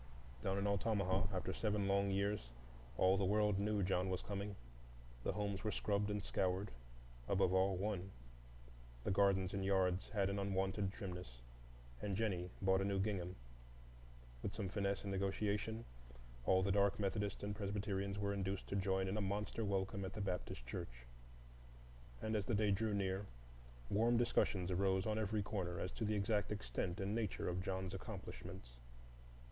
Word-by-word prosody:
Down 95 0 0
in 100 - 0
Altamaha, 100 -1 +2
after 95 -2 -1
seven 105 -2 +1
long 100 0 +3
years, 100 -8 0 0.5
all 95 +1 +5
the 100 - +1
world 105 0 +3
knew 105 0 +1
John 90 0 +1
was 90 - -1
coming. 100 0 -3 0.7
The - - 0
homes 100 -2 -2
were 110 - +1
scrubbed 105 -1 +1
and 105 -1 -1
scoured,—above 60 - -1
all, 95 +1 +4
one; 95 -1 -1 0.9
the - - 0
gardens 95 -1 +3
and 100 -1 -1
yards 95 -1 +2
had 100 -3 +2
an 100 - -1
unwonted 95 0 0
trimness, 90 - -6 0.6
and 100 -2 -1
Jennie 95 -4 0
bought 95 0 +4
a - - +2
new 100 0 +1
gingham. 95 -3 -1 1.1
With 100 - -3
some 100 -4 -2
finesse 100 0 0
and 100 - -3
negotiation, 105 +3 0 0.6
all 95 0 +5
the 100 - +2
dark 100 0 +3
Methodists 100 0 -1
and 105 0 -2
Presbyterians 100 -1 -1
were 100 0 0
induced 95 -1 -2
to - - -1
join 95 -1 +1
in 95 +3 -1
a - - +1
monster 105 +3 -1
welcome 100 -1 0
at 95 0 -4
the 110 - -5
Baptist 90 -10 -3
Church; 60 0 -6 1.2
and 110 0 0
as 105 -2 0
the 120 - +2
day 105 0 +3
drew 105 +1 +1
near, 95 0 0 0.6
warm 115 +3 +4
discussions 95 -6 +2
arose 95 +1 +2
on 110 0 +1
every 105 -1 0
corner 90 -4 -2
as 90 - -2
to 110 - -2
the 105 0 +1
exact 105 +1 +1
extent 100 -3 -2
and 100 +1 -1
nature 110 -4 -1
of 90 +1 0
John's 95 0 -2
accomplishments. - - -7
100 Hz, 165 wpm, -39 LUFS, 95-105 Hz, 1.2 s, all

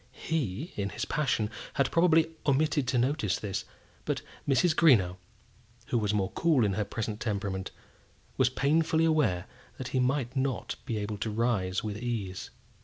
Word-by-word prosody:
He, 150 - -2
in 100 -1 -2
his - - -3
passion, 125 -7 0 0.2
had 140 - +2
probably 165 -1 +4 0.2
omitted 145 -1 +2
to 125 - +1
notice 120 - +1
this; 100 -2 -4 0.4
but - - -2 0.2
Mrs. 145 +5 +3
Greenow, 100 - +5 0.7
who 120 - +2
was 105 -2 0
more 100 -2 0
cool 155 -9 +3
in 100 - +1
her 105 - 0
present 105 +1 -4
temperament, 100 -4 -2 0.7
was 130 -2 +3
painfully 160 +5 +2
aware 125 - +2 0.3
that 130 - -5
he 130 - 0
might 130 -1 0
not 130 -2 -1
be 115 -4 -1
able 105 0 -3
to 110 - -2
rise 105 -5 0
with 105 -1 -3
ease. 110 -6 -3
120 Hz, 160 wpm, -29 LUFS, 105-145 Hz, 0.7 s, Greenow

